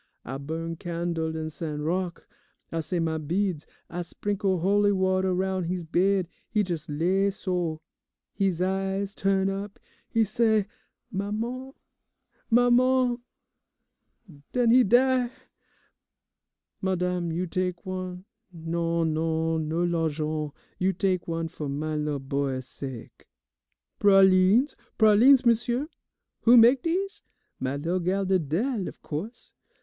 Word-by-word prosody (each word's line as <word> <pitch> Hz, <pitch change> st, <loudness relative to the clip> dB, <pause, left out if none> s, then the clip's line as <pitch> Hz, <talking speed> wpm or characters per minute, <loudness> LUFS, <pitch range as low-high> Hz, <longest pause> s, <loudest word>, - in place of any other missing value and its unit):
I 135 Hz, +2 st, -5 dB
burn 165 Hz, +3 st, -4 dB
candle 170 Hz, -1 st, -3 dB
in 160 Hz, 0 st, -4 dB
St. 155 Hz, -1 st, -5 dB
Rocque, 175 Hz, +3 st, -2 dB, 0.5 s
I 165 Hz, -, -2 dB
say 170 Hz, +3 st, -2 dB
my 160 Hz, -1 st, -1 dB
beads, 170 Hz, +1 st, -1 dB, 0.2 s
I 175 Hz, +1 st, -5 dB
sprinkle 195 Hz, +2 st, -1 dB
holy 205 Hz, +2 st, +3 dB
water 190 Hz, -1 st, +1 dB
roun' 185 Hz, 0 st, -1 dB
he's 180 Hz, +1 st, -2 dB
bed; 185 Hz, +3 st, +1 dB, 0.2 s
he 215 Hz, -3 st, +2 dB
jes' 170 Hz, -7 st, -4 dB
lay 185 Hz, +7 st, +1 dB
so, 180 Hz, -5 st, -2 dB, 0.5 s
he's 185 Hz, -3 st, 0 dB
eyes 195 Hz, +1 st, -1 dB
turn 195 Hz, -1 st, +1 dB
up, 195 Hz, +1 st, -4 dB, 0.3 s
he 225 Hz, -1 st, +3 dB
say 220 Hz, -1 st, +2 dB, 0.5 s
'Maman, 230 Hz, +7 st, -3 dB, 0.8 s
maman,' 245 Hz, +1 st, +4 dB, 1.3 s
den 245 Hz, -2 st, +3 dB
he 250 Hz, +1 st, +7 dB
die! 250 Hz, +2 st, +3 dB, 1.5 s
Madame, 180 Hz, -2 st, -1 dB
you 175 Hz, +3 st, -1 dB
tak' 180 Hz, 0 st, -3 dB
one. 185 Hz, 0 st, -5 dB, 0.3 s
Non, 165 Hz, -1 st, -1 dB
non, 160 Hz, 0 st, 0 dB
no 165 Hz, +2 st, 0 dB
l'argent, 155 Hz, -3 st, -1 dB, 0.3 s
you 190 Hz, +1 st, +2 dB
tak' 185 Hz, -1 st, 0 dB
one 165 Hz, -1 st, -2 dB
fo' 150 Hz, -2 st, -6 dB
my 155 Hz, +3 st, -3 dB
lil' 150 Hz, -1 st, -1 dB
boy's 135 Hz, -1 st, -2 dB
sake. 130 Hz, -4 st, -9 dB, 0.7 s
"Pralines, 195 Hz, +6 st, +5 dB, 0.2 s
pralines, 235 Hz, +5 st, +6 dB
m'sieu? 240 Hz, +4 st, +2 dB, 0.6 s
Who 240 Hz, +1 st, +8 dB
mak' 240 Hz, +3 st, +7 dB
dese? 375 Hz, +4 st, -2 dB, 0.4 s
My 130 Hz, +1 st, -2 dB
lil' 170 Hz, +6 st, -1 dB
gal, 190 Hz, +3 st, 0 dB
Didele, 190 Hz, -, 0 dB
of -, -, -9 dB
co'se. 180 Hz, +11 st, -6 dB
185 Hz, 120 wpm, -26 LUFS, 165-205 Hz, 1.5 s, Who